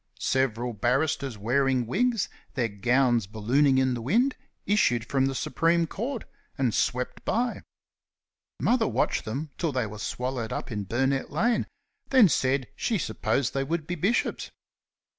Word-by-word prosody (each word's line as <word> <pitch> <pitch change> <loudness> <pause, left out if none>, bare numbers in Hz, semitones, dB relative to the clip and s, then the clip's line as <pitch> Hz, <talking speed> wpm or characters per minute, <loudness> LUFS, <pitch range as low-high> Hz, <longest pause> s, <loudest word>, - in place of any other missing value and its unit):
Several 125 -2 0
barristers 130 +3 0
wearing 130 +3 +1
wigs, 230 - +1 0.3
their 125 -4 +1
gowns 120 +1 +2
ballooning 130 +7 +2
in 130 -1 +2
the 120 - -4
wind, 240 - +2 0.3
issued 120 - +2
from 135 -1 +1
the 135 - -2
Supreme 165 +7 +1
Court 235 - -4 0.3
and 125 -5 +1
swept 125 0 -1
by. 240 +2 -1 1.0
Mother 235 -2 +2
watched - - 0
them 140 +7 -4
till 165 -3 0
they 130 -3 0
were 105 0 -8
swallowed 125 -1 -3
up - - -4
in 105 -2 -3
Burnett 135 +5 0
lane, 230 +11 +1 0.4
then 255 -8 +6
said 130 -1 +1
she 225 +7 0
supposed 115 - -1
they 135 - 0
would 160 +2 -2
be 175 - -3
bishops. 190 +8 0
135 Hz, 145 wpm, -27 LUFS, 120-165 Hz, 1.0 s, then